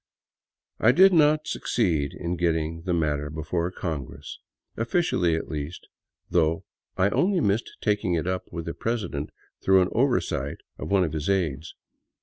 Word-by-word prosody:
I 120 - +5
did 190 +5 +7
not 155 -1 +4
succeed 80 - 0
in 85 +1 -3
getting 80 -1 0
the 90 - 0
matter 75 -3 0
before 80 +3 -2
Congress 80 -8 -6 0.2
— - - -56
officially, 115 - +1
at 80 - -3
least 75 +2 -6 0.2
— - - -53
though 80 -1 +2 0.3
I 95 +2 +3
only 185 - +2
missed 105 -4 0
taking 105 -4 +1
it 80 - -1
up 95 0 -3
with 85 -1 -5
the 85 - -3
president 105 -11 -3 0.3
through 95 -1 +5
an 90 - -2
oversight 115 - 0 0.2
of - - -5
one 100 -2 +4
of 80 -3 -2
his 80 +3 -2
aids. 85 -6 -1
90 Hz, 160 wpm, -26 LUFS, 80-105 Hz, 0.3 s, did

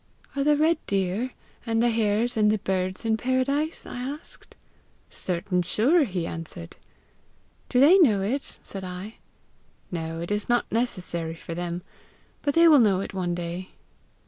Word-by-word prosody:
'Are 280 - +1
the 295 0 +4
red 315 +1 +2
deer, 195 +5 0 0.3
and 225 -1 0
the 240 +1 +3
hares, 225 +2 +1
and 210 -1 +4
the 215 - +2
birds 185 0 -2
in 220 -1 +2
paradise?' 275 +6 0
I - - -7
asked. 280 +5 -7 0.6
'Certain 180 0 -1
sure!' 265 - +3
he 180 -6 -3
answered. 160 - -7 0.9
'Do 250 - +2
they 325 +9 +7
know 215 - +4
it?' 265 +8 -2
said 195 -1 -7
I. 185 +4 -7 0.7
'No, 165 -1 -4
it 170 +3 -5
is 210 +2 -1
not 240 0 +3
necessary 180 -8 -1
for 165 - -7
them; 175 +1 -4 0.6
but 285 -1 0
they 335 0 +7
will 305 -3 +8
know 205 -5 +4
it 195 - -5
one 180 -2 -1
day.' 175 +2 -5
210 Hz, 160 wpm, -26 LUFS, 180-255 Hz, 0.9 s, will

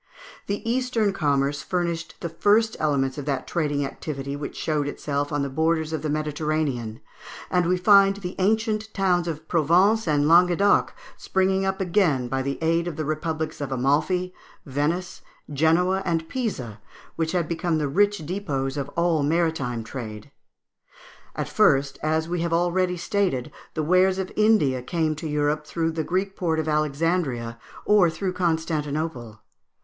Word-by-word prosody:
The 205 +3 -3
Eastern 235 -4 +1
commerce 145 -4 0
furnished 170 -1 -2
the 170 - -3
first 210 +6 +2
elements 140 -2 0
of 140 - -6
that 140 -3 -2
trading 145 -4 -1
activity 140 0 -5
which 145 0 -6
showed 150 -2 -1
itself 145 0 -3
on 145 -1 0
the - - -1
borders 160 +2 0
of 160 - -2
the 155 - -2
Mediterranean, 150 -6 -2 0.5
and 180 -2 +2
we 180 +1 +2
find 195 +1 +5
the 185 -2 -6
ancient 220 +2 0
towns 180 -3 +1
of 160 -1 -5
Provence 180 +7 +3
and 145 -1 +2
Languedoc 180 +4 +4 0.2
springing 190 0 +1
up 190 +1 -1
again 170 -9 +1
by 135 +1 -1
the 140 +1 -3
aide 165 +1 +1
of 170 - -4
the 155 - -3
republics 155 0 -3
of 140 -1 -4
Amalfi, 150 +8 +1 0.3
Venice, 150 +6 -2 0.3
Genoa, 170 +6 +2
and 165 -3 -1
Pisa, 130 - -4 0.3
which 160 0 -1
had 175 -3 0
become 170 0 -1
the 150 -2 0
rich 205 +5 +2
depôts 145 -7 -3
of 140 0 -3
all 170 -2 +2
maritime 145 -6 0
trade. 110 -3 -8 1.0
At - - -3
first, 135 0 +2
as 160 +1 0
we 175 0 -2
have 170 0 -1
already 180 +1 +1
stated, 175 -8 -1 0.2
the 155 - -1
wares 185 +3 +3
of 190 -1 -3
India 210 - +3
came 160 +3 -1
to 160 - -5
Europe 150 0 0
through 165 -1 -1
the 160 0 -2
Greek 190 +4 -1
port 165 -3 -1
of 160 - -2
Alexandria, 150 -6 -1 0.3
or 205 -5 +5
through 185 +3 -3
Constantinople. 155 -8 -2
160 Hz, 155 wpm, -24 LUFS, 145-180 Hz, 1.0 s, find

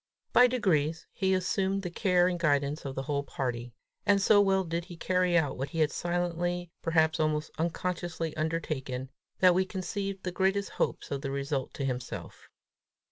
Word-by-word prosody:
By 250 - +8
degrees 165 - +1
he 190 -1 +1
assumed 190 +1 0
the 180 - -4
care 180 -1 +3
and 180 -1 -1
guidance 145 -2 +1
of 135 -1 -4
the 135 - -2
whole 140 +1 -1
party; 125 -3 -4 0.3
and 205 -1 +4
so 205 +1 +6
well 190 -1 +3
did 170 0 -3
he 175 -2 -10
carry 180 0 +2
out 145 -5 +1
what 135 +1 -2
he 165 - -4
had 150 -2 +3
silently, 175 0 -1
perhaps 160 -1 +2
almost 155 -1 0
unconsciously 170 -1 -2
undertaken, 145 -5 -3 0.3
that 185 -1 +7
we 185 +2 +3
conceived 195 +1 -4
the 180 - -2
greatest 195 +2 +1
hopes - - -2
of 140 -1 -2
the 140 - -3
result 140 -1 -2
to 140 - -2
himself. 125 -2 -5
170 Hz, 175 wpm, -29 LUFS, 145-185 Hz, 0.3 s, By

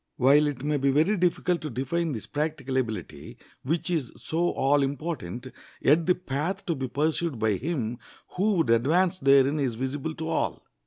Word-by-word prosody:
While 140 +4 +5
it 140 -3 -4
may 150 0 +1
be 140 0 +1
very 155 +10 +3
difficult 180 -1 +1
to 155 - -4
define 145 +7 -1
this 110 - -6
practical 150 -3 -2
ability, 110 -8 -4 0.2
which 165 +6 -2
is 150 -9 -1
so 170 +2 -1
all 140 +2 +2
important, 135 - -4 0.3
yet 160 +5 +3
the 180 - +4
path 160 +2 -3
to 170 - 0
be 135 -3 -3
pursued 155 +2 -1
by 110 -1 +1
him 125 - -3 0.3
who 205 +4 +1
would 165 -10 +2
advance 170 +11 +2
therein 140 +1 +4
is 130 -5 0
visible 135 +5 -3
to 160 - -5
all. - - -2
145 Hz, 175 wpm, -26 LUFS, 130-165 Hz, 0.3 s, While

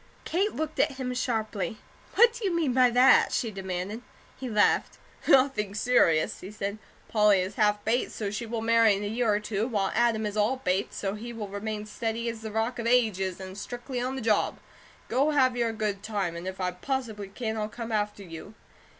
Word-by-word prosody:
Kate 390 +5 0
looked 315 0 -3
at - - +3
him 260 -1 -4
sharply: 220 -3 -2 0.4
"What 470 +2 +6
do 475 -1 -8
you 375 -4 +1
mean 310 -7 +1
by 255 -1 +5
that?" 250 +2 +5
she 230 -4 -1
demanded. 190 +2 -4 0.3
He 260 - -6
laughed: 210 -2 +2 0.3
"Nothing 255 -7 +3
serious," 190 -9 +3
he 185 - -8
said. 205 0 -4 0.3
"Polly 210 -3 +4
is 185 +2 -3
half 210 0 +1
Bates, 235 +3 0
so 205 -2 -3
she 220 +3 -4
will 225 0 -3
marry 230 -2 +5
in 200 - -4
a - - -2
year 225 +1 +1
or 205 - +2
two, 210 +1 -2
while 205 -6 0
Adam 230 -2 +2
is 210 0 -3
all 215 +5 +2
Bates, 190 -6 -1
so 195 -1 -2
he 230 +3 -7
will 225 -3 -5
remain 210 +1 -4
steady 225 +2 -3
as 230 -1 -6
the 220 - -5
Rock 225 +3 -1
of 230 - -2
Ages, 205 -7 +2
and 190 0 -8
strictly 245 +4 -5
on 255 +2 -2
the 265 - -4
job. 215 -2 +1 0.5
Go 270 +5 +2
have 255 -2 +4
your 235 -2 +1
good 210 -3 -2
time, 200 -5 -2
and 170 +2 -6
if 190 0 -5
I 180 -1 0
possibly 220 +1 -4
can, 220 +2 -4
I'll 215 -1 -2
come 230 +1 -6
after 210 -1 -1
you." 170 +4 -10
220 Hz, 210 wpm, -27 LUFS, 205-245 Hz, 0.5 s, What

